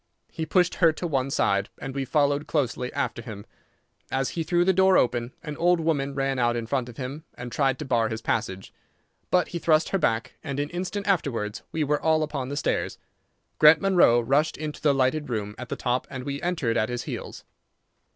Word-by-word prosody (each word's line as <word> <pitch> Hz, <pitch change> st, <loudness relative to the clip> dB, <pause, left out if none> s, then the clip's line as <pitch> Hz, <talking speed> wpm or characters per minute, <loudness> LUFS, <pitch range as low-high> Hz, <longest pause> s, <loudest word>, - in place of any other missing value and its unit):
He 160 Hz, -, -4 dB
pushed 180 Hz, +1 st, +3 dB
her 165 Hz, -2 st, +7 dB
to 175 Hz, -, -5 dB
one 135 Hz, -5 st, 0 dB
side, 100 Hz, -7 st, +1 dB
and 135 Hz, -1 st, -6 dB
we 135 Hz, 0 st, -2 dB
followed 145 Hz, +1 st, +1 dB
closely 125 Hz, -4 st, -1 dB
after 120 Hz, -, -2 dB
him. 110 Hz, -3 st, -9 dB, 0.6 s
As 135 Hz, -1 st, 0 dB
he 170 Hz, -, -3 dB
threw 175 Hz, +2 st, +2 dB
the 190 Hz, -, +4 dB
door 190 Hz, 0 st, +5 dB
open 120 Hz, 0 st, +1 dB
an 150 Hz, -, -5 dB
old 175 Hz, 0 st, +3 dB
woman 145 Hz, -4 st, 0 dB
ran 135 Hz, -1 st, 0 dB
out 120 Hz, -1 st, +2 dB
in 115 Hz, -1 st, -2 dB
front 125 Hz, 0 st, -1 dB
of 115 Hz, -, -12 dB
him 140 Hz, +4 st, -5 dB
and 125 Hz, -1 st, -7 dB
tried 135 Hz, -1 st, +1 dB
to 150 Hz, -, -6 dB
bar 115 Hz, -4 st, +1 dB
his 110 Hz, -, -3 dB
passage, 95 Hz, -4 st, -2 dB, 0.6 s
but 180 Hz, -1 st, +2 dB
he 170 Hz, -, -4 dB
thrust 160 Hz, -1 st, +3 dB
her 195 Hz, -, 0 dB
back, 115 Hz, -7 st, 0 dB
and 140 Hz, 0 st, -4 dB
an 145 Hz, +1 st, -2 dB
instant 185 Hz, +3 st, -3 dB
afterwards 120 Hz, -, -1 dB
we 160 Hz, -, 0 dB
were 150 Hz, 0 st, 0 dB
all 160 Hz, -1 st, +3 dB
upon 140 Hz, -4 st, -4 dB
the 145 Hz, -, -4 dB
stairs. -, -, -1 dB, 0.6 s
Grant 155 Hz, +1 st, +8 dB
Munro 180 Hz, -11 st, +5 dB
rushed 140 Hz, +7 st, +1 dB
into 155 Hz, -1 st, -5 dB
the 145 Hz, -2 st, +3 dB
lighted 135 Hz, +3 st, +1 dB
room 105 Hz, -3 st, -3 dB
at 125 Hz, -, -7 dB
the -, -, -2 dB
top, 125 Hz, +1 st, -1 dB
and 130 Hz, -2 st, -6 dB
we 140 Hz, +1 st, -4 dB
entered 165 Hz, -10 st, 0 dB
at 110 Hz, -, +1 dB
his 120 Hz, -1 st, -3 dB
heels. -, -, -7 dB
140 Hz, 210 wpm, -26 LUFS, 125-160 Hz, 0.6 s, Grant